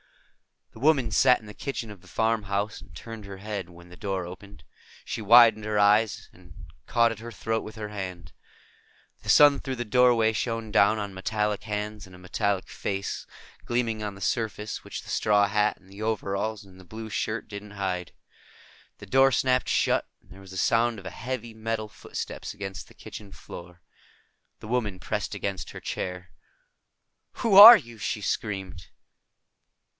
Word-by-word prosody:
The -, -, -13 dB
woman 135 Hz, -4 st, +3 dB
sat 125 Hz, +4 st, +5 dB
in 110 Hz, -, -16 dB
the 105 Hz, -, -10 dB
kitchen 120 Hz, -5 st, -5 dB
of 100 Hz, -4 st, -12 dB
the 90 Hz, -, -19 dB
farmhouse 105 Hz, -2 st, -1 dB
and 90 Hz, -3 st, -16 dB
turned 115 Hz, +3 st, -9 dB
her 100 Hz, -1 st, -9 dB
head 100 Hz, -3 st, -5 dB
when 85 Hz, 0 st, -15 dB
the 90 Hz, -, -13 dB
door 95 Hz, -3 st, -3 dB
opened. 100 Hz, +3 st, -12 dB, 0.4 s
She -, -, -4 dB
widened 115 Hz, 0 st, +7 dB
her 105 Hz, -1 st, -1 dB
eyes 105 Hz, 0 st, +3 dB
and 90 Hz, -2 st, -17 dB, 0.3 s
caught 115 Hz, 0 st, +3 dB
at 110 Hz, -, -7 dB
her 120 Hz, +1 st, -8 dB
throat 110 Hz, -1 st, -2 dB
with 110 Hz, -, -9 dB
her 105 Hz, -1 st, -6 dB
hand. 90 Hz, -4 st, -7 dB, 0.9 s
The -, -, -9 dB
sun 145 Hz, -1 st, +7 dB
through 135 Hz, -2 st, -4 dB
the 120 Hz, -1 st, -4 dB
doorway 120 Hz, -1 st, +4 dB
shone 115 Hz, -1 st, -3 dB
down 100 Hz, +2 st, +4 dB
on 100 Hz, -2 st, -4 dB
metallic 105 Hz, +1 st, -2 dB
hands 105 Hz, -1 st, -4 dB
and 95 Hz, -, -14 dB
a -, -, -13 dB
metallic 95 Hz, +2 st, -2 dB
face, 95 Hz, -1 st, -4 dB, 0.4 s
gleaming 115 Hz, -2 st, -1 dB
on 105 Hz, -2 st, -4 dB
the 100 Hz, -, -13 dB
surface 110 Hz, -1 st, -2 dB
which -, -, -7 dB
the -, -, -13 dB
straw 105 Hz, -1 st, +3 dB
hat 105 Hz, +1 st, +1 dB
and 95 Hz, -, -24 dB
the 100 Hz, +2 st, -12 dB
overalls 110 Hz, 0 st, -2 dB
and 95 Hz, -2 st, -17 dB
the 95 Hz, -, -14 dB
blue 110 Hz, +4 st, -8 dB
shirt 110 Hz, +2 st, -2 dB
didn't 105 Hz, 0 st, -9 dB
hide. 95 Hz, -3 st, -3 dB, 0.8 s
The -, -, -11 dB
door 135 Hz, +1 st, +4 dB
snapped 130 Hz, 0 st, +1 dB
shut, -, -, +1 dB
and -, -, -26 dB
there 95 Hz, -, -13 dB
was 95 Hz, -1 st, -12 dB
a -, -, -7 dB
sound 115 Hz, +4 st, +2 dB
of 100 Hz, -, -11 dB
heavy 120 Hz, +2 st, -5 dB
metal 110 Hz, -1 st, -3 dB
footsteps -, -, -7 dB
against 95 Hz, -2 st, -7 dB
the -, -, -19 dB
kitchen 100 Hz, -2 st, -10 dB
floor. 90 Hz, 0 st, -11 dB, 0.8 s
The -, -, -9 dB
woman 110 Hz, -6 st, -1 dB
pressed -, -, -3 dB
against 95 Hz, -6 st, -4 dB
her -, -, -8 dB
chair. 90 Hz, 0 st, -5 dB, 1.0 s
"Who 225 Hz, -5 st, +1 dB
are 220 Hz, +4 st, +13 dB
you?" 115 Hz, -, -11 dB
she 105 Hz, 0 st, -3 dB
screamed. 95 Hz, -4 st, -4 dB
105 Hz, 175 wpm, -26 LUFS, 95-115 Hz, 1.0 s, are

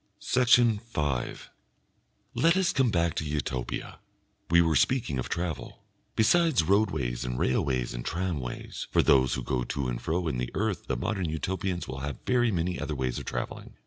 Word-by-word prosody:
Section 120 Hz, -3 st, +4 dB
5 75 Hz, -, -3 dB, 0.8 s
Let 165 Hz, +3 st, +3 dB
us 190 Hz, -2 st, +2 dB
come 130 Hz, -2 st, +3 dB
back 85 Hz, -4 st, +1 dB
to -, -, -2 dB
Utopia. 75 Hz, -4 st, -3 dB, 0.5 s
We 85 Hz, +1 st, +6 dB
were 80 Hz, -2 st, +3 dB
speaking 110 Hz, -, +2 dB
of 65 Hz, -, -4 dB
travel. 85 Hz, -3 st, -4 dB, 0.3 s
Besides 160 Hz, -, +4 dB
roadways 70 Hz, -, +1 dB
and 60 Hz, 0 st, -3 dB
railways 65 Hz, -1 st, 0 dB
and -, -, -5 dB
tramways, 80 Hz, -8 st, -4 dB
for -, -, +3 dB
those 65 Hz, -2 st, +4 dB
who 65 Hz, -, -4 dB
go 60 Hz, 0 st, -1 dB
to 70 Hz, +2 st, -3 dB
and -, -, -3 dB
fro 85 Hz, +2 st, -1 dB
in 65 Hz, -6 st, -1 dB
the 60 Hz, 0 st, -2 dB
earth 105 Hz, -2 st, -1 dB
the 65 Hz, -, -1 dB
Modern 95 Hz, -, -1 dB
Utopians 90 Hz, +3 st, -2 dB
will 65 Hz, +1 st, -5 dB
have 70 Hz, -1 st, -4 dB
very 120 Hz, -1 st, +3 dB
many 90 Hz, -1 st, -1 dB
other 75 Hz, -, -3 dB
ways 65 Hz, -2 st, -2 dB
of -, -, -8 dB
travelling. 60 Hz, -, -5 dB
80 Hz, 175 wpm, -28 LUFS, 65-105 Hz, 0.8 s, We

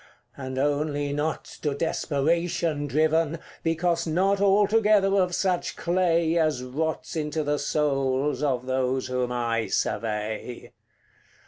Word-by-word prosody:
And 130 Hz, -1 st, -6 dB
only 145 Hz, +1 st, 0 dB
not 150 Hz, +2 st, -2 dB, 0.2 s
to 145 Hz, -2 st, -1 dB
desperation 160 Hz, 0 st, 0 dB
driven, 155 Hz, +3 st, +1 dB, 0.2 s
Because 170 Hz, +1 st, 0 dB
not 190 Hz, +5 st, +1 dB
altogether 205 Hz, 0 st, +4 dB
of 180 Hz, -1 st, 0 dB
such 185 Hz, -2 st, 0 dB
clay 170 Hz, -2 st, +1 dB
As 155 Hz, -6 st, +1 dB
rots 155 Hz, +7 st, -3 dB
into 155 Hz, 0 st, -2 dB
the 145 Hz, 0 st, 0 dB
souls 135 Hz, -2 st, 0 dB
of 130 Hz, -4 st, 0 dB
those 130 Hz, 0 st, 0 dB
whom 125 Hz, -1 st, -1 dB
I 115 Hz, -2 st, -1 dB
survey. 110 Hz, +2 st, -3 dB
150 Hz, 115 wpm, -26 LUFS, 130-170 Hz, 0.2 s, altogether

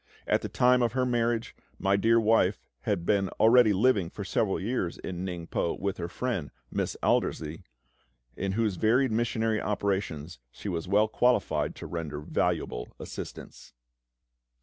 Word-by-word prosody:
At -, -, +2 dB
the -, -, -4 dB
time 125 Hz, 0 st, +4 dB
of 120 Hz, -1 st, +1 dB
her 130 Hz, -1 st, +1 dB
marriage, 120 Hz, -1 st, 0 dB, 0.2 s
my 100 Hz, 0 st, +2 dB
dear 115 Hz, +3 st, +4 dB
wife 105 Hz, -3 st, +3 dB, 0.3 s
had 85 Hz, -, 0 dB
been 100 Hz, -2 st, +2 dB
already 115 Hz, 0 st, +6 dB
living 100 Hz, -3 st, +3 dB
for 100 Hz, -, -7 dB
several 95 Hz, +1 st, 0 dB
years 95 Hz, -4 st, -2 dB
in 90 Hz, -1 st, -5 dB
Ningpo 85 Hz, -2 st, -3 dB
with 100 Hz, 0 st, -2 dB
her 85 Hz, -, -3 dB
friend, 90 Hz, -, -3 dB, 0.2 s
Miss -, -, -2 dB
Aldersey, 80 Hz, +1 st, 0 dB, 0.7 s
in 95 Hz, -1 st, -2 dB
whose 105 Hz, -3 st, 0 dB
varied 120 Hz, +5 st, +3 dB
missionary 110 Hz, -1 st, 0 dB
operations 95 Hz, -7 st, -2 dB
she 100 Hz, -, -7 dB
was 85 Hz, -1 st, -3 dB
well 105 Hz, +3 st, +4 dB
qualified 125 Hz, +3 st, +1 dB
to -, -, -8 dB
render 80 Hz, -4 st, -4 dB
valuable -, -, -1 dB
assistance. -, -, -9 dB
100 Hz, 150 wpm, -28 LUFS, 90-115 Hz, 0.7 s, already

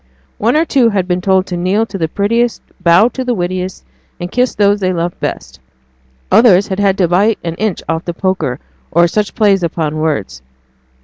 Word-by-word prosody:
One 230 Hz, +5 st, +1 dB
or 320 Hz, -, +2 dB
two 260 Hz, -7 st, +3 dB
had 195 Hz, -4 st, -1 dB
been 180 Hz, 0 st, -1 dB
told 190 Hz, 0 st, +2 dB
to 180 Hz, -, -5 dB
kneel 185 Hz, +5 st, 0 dB
to 210 Hz, -, -7 dB
the 160 Hz, -, 0 dB
prettiest, 230 Hz, +7 st, 0 dB, 0.2 s
bow 175 Hz, +7 st, +5 dB
to 260 Hz, +2 st, -5 dB
the 250 Hz, -1 st, -1 dB
wittiest, 185 Hz, 0 st, -4 dB, 0.3 s
and 175 Hz, 0 st, -5 dB
kiss 250 Hz, 0 st, 0 dB
those 205 Hz, 0 st, +2 dB
they 185 Hz, -2 st, 0 dB
loved 175 Hz, -1 st, -3 dB
best; 65 Hz, 0 st, -5 dB, 0.7 s
others 200 Hz, -5 st, +5 dB
had 190 Hz, 0 st, -3 dB
had 200 Hz, -1 st, +2 dB
to 180 Hz, -, +2 dB
bite 200 Hz, +6 st, +2 dB
an 165 Hz, -, -3 dB
inch 215 Hz, -5 st, -2 dB
off 165 Hz, +1 st, -2 dB
the 175 Hz, -, -3 dB
poker, 185 Hz, -9 st, -2 dB, 0.3 s
or 170 Hz, +1 st, +3 dB
such 210 Hz, +4 st, -2 dB
plays 205 Hz, -4 st, +3 dB
upon 160 Hz, -2 st, -2 dB
words. 150 Hz, -, -2 dB
190 Hz, 195 wpm, -15 LUFS, 175-210 Hz, 0.7 s, bow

